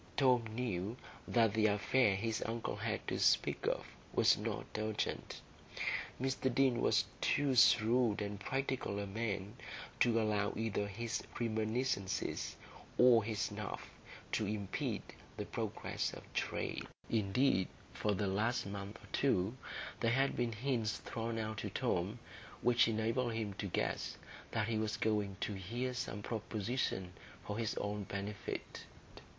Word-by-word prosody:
Tom 125 Hz, -4 st, +5 dB
knew 110 Hz, -2 st, -2 dB, 0.3 s
that 115 Hz, -3 st, +4 dB
the 110 Hz, -1 st, +4 dB
affair 105 Hz, +1 st, +3 dB
his 110 Hz, +3 st, -1 dB
uncle 115 Hz, 0 st, -2 dB
had -, -, -2 dB
to -, -, -1 dB
speak -, -, +3 dB
of -, -, 0 dB, 0.3 s
was -, -, +6 dB
not -, -, -3 dB
urgent; 110 Hz, 0 st, -2 dB, 0.8 s
Mr 130 Hz, 0 st, +1 dB
Deane 130 Hz, -1 st, +3 dB
was -, -, +4 dB, 0.2 s
too 145 Hz, -2 st, +3 dB
shrewd 115 Hz, -1 st, +5 dB
and 100 Hz, -1 st, -3 dB
practical 130 Hz, -2 st, -1 dB
a 100 Hz, -, -1 dB
man 100 Hz, -1 st, -2 dB, 0.5 s
to 115 Hz, -1 st, +4 dB
allow 105 Hz, -2 st, +1 dB
either 105 Hz, -2 st, 0 dB
his 115 Hz, +3 st, -2 dB, 0.2 s
reminiscences 110 Hz, -3 st, 0 dB, 0.4 s
or 120 Hz, -3 st, +7 dB
his 110 Hz, 0 st, -2 dB
snuff 105 Hz, -1 st, -3 dB, 0.4 s
to 105 Hz, -, +1 dB
impede 100 Hz, -2 st, -2 dB, 0.3 s
the -, -, -2 dB
progress -, -, -2 dB
of -, -, -8 dB
trade. -, -, -2 dB, 0.2 s
Indeed, 105 Hz, -1 st, +3 dB, 0.3 s
for 105 Hz, -1 st, +1 dB
the 100 Hz, -, 0 dB
last 105 Hz, +6 st, +1 dB
month 100 Hz, +1 st, -5 dB
or -, -, -13 dB
two, 110 Hz, -5 st, +2 dB, 0.4 s
there 115 Hz, 0 st, +3 dB
had 135 Hz, +2 st, +3 dB
been 120 Hz, -2 st, 0 dB
hints 115 Hz, -2 st, 0 dB
thrown 115 Hz, 0 st, -3 dB
out 110 Hz, -1 st, -2 dB
to 105 Hz, -, -3 dB
Tom 100 Hz, -1 st, 0 dB, 0.5 s
which 120 Hz, -1 st, +5 dB
enabled 115 Hz, +2 st, +1 dB
him 110 Hz, -3 st, -2 dB
to 100 Hz, -, -1 dB
guess 90 Hz, -, -1 dB, 0.3 s
that 110 Hz, -1 st, 0 dB
he 110 Hz, -1 st, +1 dB
was 110 Hz, -1 st, -1 dB
going 105 Hz, -3 st, +1 dB
to 105 Hz, -, -1 dB
hear 120 Hz, +7 st, -2 dB
some 105 Hz, -4 st, -3 dB
proposition 110 Hz, -4 st, -2 dB, 0.3 s
for 105 Hz, +2 st, -3 dB
his 115 Hz, -2 st, 0 dB
own 105 Hz, 0 st, -2 dB
benefit. 100 Hz, +2 st, -5 dB
110 Hz, 140 wpm, -36 LUFS, 100-120 Hz, 0.8 s, or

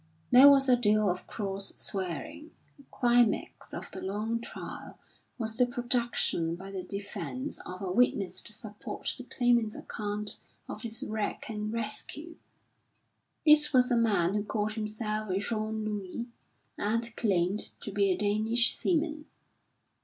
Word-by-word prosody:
There 260 Hz, +3 st, +10 dB
was 275 Hz, -1 st, +5 dB
a 255 Hz, -, +6 dB
deal 215 Hz, -3 st, +3 dB
of 180 Hz, -, -6 dB
cross 195 Hz, -2 st, -3 dB
swearing. 190 Hz, -, -4 dB, 0.3 s
The 280 Hz, -, -19 dB
climax 240 Hz, -2 st, +1 dB
of -, -, -6 dB
the -, -, -7 dB
long 215 Hz, +4 st, -2 dB
trial -, -, -8 dB, 0.4 s
was 220 Hz, -2 st, -3 dB
the 250 Hz, -1 st, +4 dB
production 240 Hz, -9 st, 0 dB
by 190 Hz, +3 st, -9 dB
the 190 Hz, -1 st, -4 dB
defence 195 Hz, -11 st, -5 dB
of 185 Hz, +2 st, -7 dB
a 185 Hz, -, -2 dB
witness 205 Hz, -3 st, +1 dB
to -, -, -12 dB
support 215 Hz, -1 st, -4 dB
the 255 Hz, -, -9 dB
Claimant's 240 Hz, -4 st, +2 dB
account 210 Hz, 0 st, -2 dB, 0.3 s
of -, -, -6 dB
his 230 Hz, +2 st, -3 dB
wreck 215 Hz, -5 st, -3 dB
and 210 Hz, -1 st, -3 dB
rescue. 230 Hz, +9 st, -4 dB, 1.1 s
This 300 Hz, -1 st, +7 dB
was 250 Hz, -1 st, +5 dB
a -, -, +4 dB
man 205 Hz, -6 st, +2 dB
who 210 Hz, 0 st, 0 dB
called 210 Hz, 0 st, -2 dB
himself 215 Hz, -1 st, -3 dB
Jean 215 Hz, +1 st, -2 dB
Luie 210 Hz, +3 st, -4 dB, 0.5 s
and 230 Hz, +2 st, -1 dB
claimed 195 Hz, -2 st, +1 dB, 0.2 s
to 205 Hz, -, -6 dB
be 200 Hz, 0 st, +2 dB
a 185 Hz, -, +2 dB
Danish 220 Hz, +4 st, +3 dB
seaman. 310 Hz, -3 st, 0 dB
215 Hz, 145 wpm, -30 LUFS, 205-240 Hz, 1.1 s, There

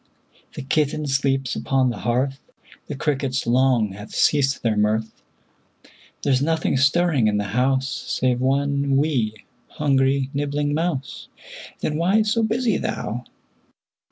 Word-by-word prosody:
The -, -, -6 dB
kitten 150 Hz, +2 st, 0 dB
sleeps 135 Hz, -1 st, 0 dB
upon 130 Hz, -2 st, +1 dB
the -, -, -7 dB
hearth, 130 Hz, +3 st, -1 dB, 0.5 s
The 145 Hz, -, -5 dB
crickets 135 Hz, -2 st, -1 dB
long 125 Hz, -2 st, +3 dB
have 105 Hz, +2 st, -10 dB
ceased 140 Hz, -2 st, +2 dB
their 115 Hz, -2 st, +1 dB
mirth; 110 Hz, +1 st, -1 dB, 1.0 s
There's 135 Hz, -2 st, +2 dB
nothing 160 Hz, 0 st, 0 dB
stirring 140 Hz, -2 st, +3 dB
in 105 Hz, -1 st, +1 dB
the 105 Hz, -, 0 dB
house 130 Hz, +2 st, +1 dB, 0.2 s
Save 125 Hz, -1 st, 0 dB
one 140 Hz, +1 st, +1 dB
'wee', 125 Hz, -8 st, -1 dB, 0.2 s
hungry, 135 Hz, -2 st, +1 dB
nibbling 145 Hz, +1 st, -1 dB
mouse, 155 Hz, -4 st, -3 dB, 0.5 s
Then 150 Hz, -, -1 dB
why 190 Hz, +6 st, +3 dB
so 220 Hz, +2 st, +1 dB
busy 225 Hz, 0 st, +1 dB
thou? 115 Hz, +4 st, -4 dB
135 Hz, 130 wpm, -22 LUFS, 125-150 Hz, 1.0 s, long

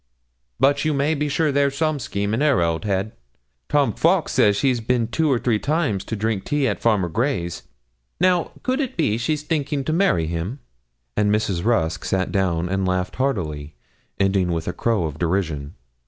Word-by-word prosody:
But 140 Hz, +1 st, +3 dB
you 155 Hz, -2 st, +1 dB
may 140 Hz, +3 st, +1 dB
be 150 Hz, -1 st, -1 dB
sure 155 Hz, +1 st, +1 dB
there's 140 Hz, 0 st, +1 dB
some 155 Hz, -2 st, 0 dB
scheme 100 Hz, -4 st, -2 dB
in 115 Hz, -, 0 dB
her 150 Hz, -3 st, +3 dB
old 85 Hz, 0 st, 0 dB
head. 100 Hz, +1 st, -1 dB, 0.6 s
Tom 140 Hz, -6 st, +2 dB
Fowkes -, -, +2 dB
says 105 Hz, -1 st, +4 dB
she's 125 Hz, 0 st, +1 dB
bin 115 Hz, 0 st, +1 dB
two 150 Hz, +6 st, +1 dB
or 130 Hz, -, +3 dB
three 115 Hz, -2 st, +1 dB
times 140 Hz, -, 0 dB
to 110 Hz, -, -3 dB
drink 110 Hz, -2 st, -1 dB
tea 145 Hz, -2 st, 0 dB
at 105 Hz, -, -1 dB
Farmer 105 Hz, -6 st, +2 dB
Gray's 85 Hz, -, -2 dB, 0.6 s
now, 180 Hz, -1 st, +2 dB
could 260 Hz, +2 st, 0 dB
it 265 Hz, -3 st, -3 dB
be 115 Hz, -9 st, +1 dB
she's 150 Hz, +5 st, -1 dB
thinking 150 Hz, -3 st, -1 dB
to 155 Hz, -, -1 dB
marry 165 Hz, -, +2 dB
him?' 85 Hz, -, -3 dB, 0.6 s
And 105 Hz, -1 st, +2 dB
Mrs. 100 Hz, -5 st, 0 dB
Rusk 85 Hz, -9 st, +1 dB
sat 95 Hz, -1 st, -1 dB
down 90 Hz, -4 st, 0 dB
and 95 Hz, +1 st, -1 dB
laughed 90 Hz, 0 st, -1 dB
heartily, 80 Hz, -, -2 dB, 0.4 s
ending 95 Hz, -2 st, +2 dB
with 80 Hz, -1 st, -2 dB
a 90 Hz, -, -1 dB
crow 115 Hz, -6 st, 0 dB
of 80 Hz, -2 st, -4 dB
derision. 80 Hz, -4 st, -1 dB
110 Hz, 185 wpm, -22 LUFS, 90-140 Hz, 0.6 s, says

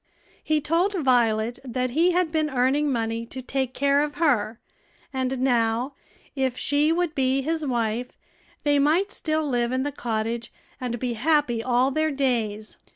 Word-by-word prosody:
He 310 Hz, -1 st, +1 dB
told 335 Hz, +7 st, +1 dB
Violet 240 Hz, -6 st, +2 dB
that 255 Hz, -1 st, -2 dB
he 330 Hz, +7 st, +3 dB
had 355 Hz, -2 st, +1 dB
been 310 Hz, -1 st, +1 dB
earning 270 Hz, +3 st, +1 dB
money 230 Hz, -1 st, -1 dB
to 260 Hz, -, -8 dB
take 260 Hz, 0 st, -3 dB
care 280 Hz, +1 st, +3 dB
of 295 Hz, 0 st, -2 dB
her, 240 Hz, -8 st, +1 dB, 0.5 s
and 260 Hz, 0 st, -1 dB
now, 240 Hz, 0 st, +1 dB, 0.4 s
if 260 Hz, -2 st, -1 dB
she 290 Hz, +2 st, +2 dB
would 340 Hz, -1 st, 0 dB
be 270 Hz, -1 st, +1 dB
his 320 Hz, +2 st, -1 dB
wife, 235 Hz, -1 st, -2 dB, 0.5 s
they 290 Hz, -1 st, +3 dB
might 325 Hz, +8 st, +2 dB
still 310 Hz, -1 st, -1 dB
live 240 Hz, -3 st, 0 dB
in 260 Hz, +1 st, 0 dB
the 290 Hz, -, -2 dB
cottage 230 Hz, -2 st, -3 dB, 0.3 s
and 245 Hz, -2 st, -3 dB
be 245 Hz, 0 st, -2 dB
happy 255 Hz, -1 st, +1 dB
all 250 Hz, +2 st, +2 dB
their 310 Hz, +3 st, +1 dB
days. 230 Hz, -7 st, -1 dB
260 Hz, 160 wpm, -25 LUFS, 240-300 Hz, 0.5 s, he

